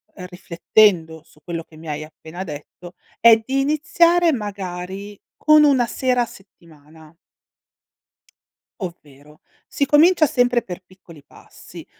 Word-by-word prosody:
riflettendo 180 -2 0
su 155 - -25
quello 170 -1 -5
che 160 - -21
mi 160 +1 -12
hai 150 0 -4
appena 160 +3 -10
detto, 175 +3 -11 0.2
è 230 -1 +7
di 265 +5 -2
iniziare 335 +4 +2
magari 200 -2 -6 0.2
con 305 0 +5
una 270 -5 +3
sera 250 0 0
a - - 0
settimana 160 -6 -18 1.7
ovvero: 150 -4 -11 0.3
si 280 - -1
comincia 310 +4 +4
sempre 245 -3 +1
per 180 -3 -9
piccoli 175 -5 -18
passi. - - -15
190 Hz, 120 wpm, -20 LUFS, 160-250 Hz, 1.7 s, è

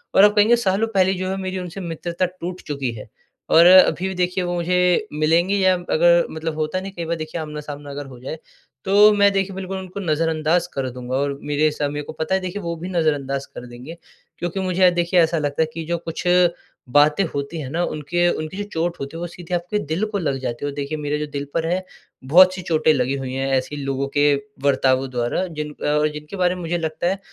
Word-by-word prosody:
और 195 - +7
आप 210 0 +6
कहेंगे 215 +3 +5
सालों 215 -1 +1
पहले 190 0 +4
जो 185 0 -3
है, 190 - -2
मेरी 190 -1 -3
उनसे 180 +1 -7
मित्रता 170 +1 -2
टूट 180 0 -6
चुकी 140 -4 -2
है 105 -2 -10 0.4
और 165 +1 +7
अभी 185 0 +6
भी 190 - -3
देखिए, 180 +1 0
वो 175 0 -2
मुझे 180 +3 +2
मिलेंगे 165 +6 +2
या 190 -1 +4
अगर 170 +1 +4
मतलब 160 0 -4
होता 155 +3 -2
है 185 - -3
ना, 195 - -5
कई 170 - -4
बार 170 +1 -1
देखिए 155 +1 -5
आमना-सामना 150 -1 -7
अगर 140 +1 -6
हो 130 -2 -12
जाए, 135 +5 -6 0.5
तो 205 +2 +6
मैं, 200 -1 +4
देखिए, 195 0 0
बिल्कुल 190 0 -5
उनको 190 +1 -7
नज़रअंदाज़ 160 0 +1
कर 135 -1 -2
दूँगा 125 +1 -5
और 140 +1 -1
मेरे 150 +1 +1
सा 150 -1 -2
मेरे 145 +1 -4
को - - -8
पता 160 +4 -1
है, 190 - 0
देखिये, 185 +2 -4
वो 170 0 -3
भी 170 +3 -7
नज़रअंदाज़ 145 -6 -1
कर 125 - -7
देंगे। 125 +8 -10 0.4
क्योंकि 175 +2 -3
मुझे 185 0 0
अ, 180 - +8
देखिये, 175 0 +2
ऐसा 165 +1 0
लगता 145 0 -1
है - - +4
कि 165 - -5
जो 170 +2 -1
कुछ 165 -1 -6 0.7
बातें 150 +7 +4
होती 140 +3 -4
हैं 130 - -6
ना, 165 +5 -1
उनके 170 +3 0
उनकी 155 +2 -4
जो 205 - -2
चोट 170 +1 -1
होती 140 +4 -6
है, - - -6
वो 175 - -3
सीधे 175 +1 -9
आपके 175 +4 -2
दिल 165 +3 -2
को - - +1
लग 140 -6 -1
जाती 125 +1 -4
है - - -1
और - - -11
देखिए, 145 +2 -3
मेरे 150 0 -2
जो 150 - -2
दिल 140 0 -4
पर 165 -1 0
है, 185 +2 -1 0.4
बहुत-सी 185 +7 +5
चोटे 155 0 +4
लगी 135 -1 0
हुई 130 -2 -5
हैं 135 +1 -2
ऐसी 130 +3 -3
लोगों 135 0 -2
के 145 0 +5 0.3
बर्तावों 135 -1 +2
द्वारा, 125 +8 -1
जिन 150 -3 -5
अ, 150 +1 0
जिनके 150 +4 -8
बारे 180 -1 +2
में 180 - -7
मुझे 170 +1 -1
लगता 160 +1 -2
है, 190 +2 0
165 Hz, 235 wpm, -21 LUFS, 145-180 Hz, 0.7 s, अ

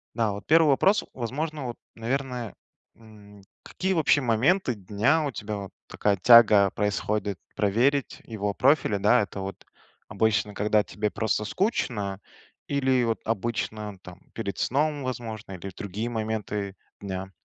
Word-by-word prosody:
Да, 115 -3 +1
вот 100 0 -7
1 160 -1 +5
вопрос, 195 +9 +3
возможно 145 +4 -4
вот, 120 - -6 0.2
наверное, 125 0 -3 0.4
м: 105 -3 -16 0.2
какие 190 +1 -2
вообще 150 -3 +3
моменты 130 - +2
дня 110 - +1
у 140 - -2
тебя 105 -2 -5
вот 100 -2 -7 0.2
такая 100 -2 0
тяга 105 -2 +7
происходит 105 -1 -1 0.2
проверить 120 +7 +1
его 105 -3 -3
профили, 130 -6 +3
да? 105 +5 +4
Это 100 -1 -5
вот 95 0 -7 0.4
обычно, 105 -2 0
когда 105 +1 +2
тебе 105 - -3
просто 110 -1 -1
скучно, 105 - -1 0.5
или 130 -3 +2
вот 115 -1 0
обычно 110 -2 -3
там 90 0 -12
перед 100 -4 -4
сном, 145 +1 0
возможно, 110 -5 -5
или 95 +2 -7
в - - -15
другие 105 +2 -4
моменты 110 -3 -3 0.2
дня? 95 -1 -5
110 Hz, 140 wpm, -26 LUFS, 100-130 Hz, 0.5 s, тяга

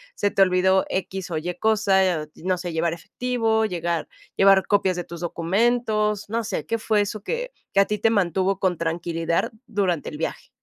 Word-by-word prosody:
se 205 - 0
te - - +1
olvidó 190 0 +4
equis 190 -1 -3
o 160 - -1
ye 175 +3 -4
cosa, 205 -3 +3 0.2
eh, - - -11 0.2
no 185 0 +1
sé, 175 -1 -5
llevar 165 +1 +1
efectivo, 225 +5 -1
llegar 170 -4 -2 0.3
llevar 195 -1 +5
copias 195 -3 +2
de 175 - -3
tus 170 0 -9
documentos, 210 +4 0
no 230 +1 -1
sé, 155 - -3
¿qué 230 - -1
fue 220 -1 +1
eso 205 0 -4
que - - -3 0.2
que 195 - +4
a 200 - +6
ti 210 +1 -2
te 225 - +3
mantuvo 195 -2 +1
con 185 -3 +1
tranquilidad 165 0 -1 0.2
durante 190 -8 -1
el 150 - -8
viaje? 160 - -4
190 Hz, 190 wpm, -24 LUFS, 175-215 Hz, 0.3 s, a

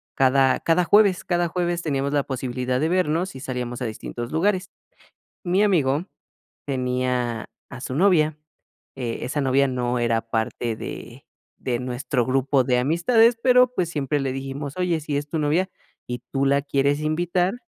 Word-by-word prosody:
cada 135 0 +3
cada 170 +2 +2
jueves. 205 -2 +4
Cada 175 -1 0
jueves 175 0 -1
teníamos 140 -2 -1
la 145 -2 +2
posibilidad 125 -1 -2
de 160 +2 +1
vernos 180 -1 0
y - - -7
salíamos 125 -2 -4
a - - -1
distintos 120 +2 -6
lugares. 185 +4 +1 0.7
Mi 185 +3 +2
amigo 160 -5 +2 0.6
tenía 125 -3 -1 0.2
a 125 - -9
su 130 - -5
novia, 155 -4 +3 0.6
eh, 120 -3 -3
esa 145 +3 -2
novia 135 +1 +2
no 125 -1 -1
era 115 -1 +1
parte 115 +1 -2
de - - -8 0.3
de 120 -2 -2
nuestro 125 0 -2
grupo 135 0 +2
de 125 -1 +2
amistades, 225 - +3
pero, 250 0 +5
pues, 180 -9 -1
siempre 145 -2 -1
le 135 -1 -2
dijimos: 135 +2 -5
"Oye, 180 -3 0
si 145 -1 -3
es 145 +1 -3
tu 160 - -2
novia 165 +6 +1 0.4
y 125 0 -3
tú 135 0 +1
la 140 +1 +3
quieres 140 0 +1
invitar, 175 +5 0
140 Hz, 165 wpm, -23 LUFS, 130-175 Hz, 0.7 s, pero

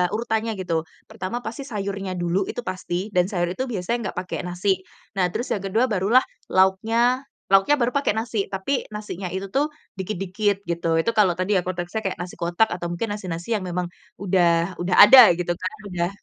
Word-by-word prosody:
urutannya 225 0 -1
gitu. 165 -3 -1 0.3
Pertama 195 +6 -4
pasti 260 +5 -5
sayurnya 195 -3 -4
dulu 175 +3 0
itu - - -4
pasti, 185 +2 -3
dan 180 - +4
sayur 175 -2 0
itu 260 - -2
biasanya 225 +2 -2
nggak - - -20
pakai 180 - -5
nasi. 185 +2 0 0.4
Nah 180 - +4
terus 240 - -3
yang 205 - -2
kedua 220 +6 +2
barulah 210 +6 +4 0.3
lauknya 225 +7 +2 0.3
lauknya 195 +9 +5
baru 235 - +2
pakai 280 -6 +2
nasi, 220 -3 -1
tapi 195 +9 -1
nasinya 200 -3 -5
itu 190 +1 -4
tuh 285 +3 +2 0.3
dikit-dikit 195 +1 -1
gitu. 170 0 -2
Itu 230 - 0
kalau 190 -4 +5
tadi 190 +3 +1
ya - - +2
konteksnya 175 +3 -3
kayak 190 - -1
nasi 180 0 -7
kotak 175 +6 +2
atau 175 -1 -4
mungkin 205 +5 -3
nasi-nasi 185 0 -5
yang 205 - -2
memang 180 0 -2 0.3
udah 175 -2 +2
udah 180 +1 +1
ada 255 -1 +10
gitu 175 0 -1
kan, 185 - -3 0.2
udah 175 0 -1
190 Hz, 185 wpm, -23 LUFS, 180-220 Hz, 0.4 s, ada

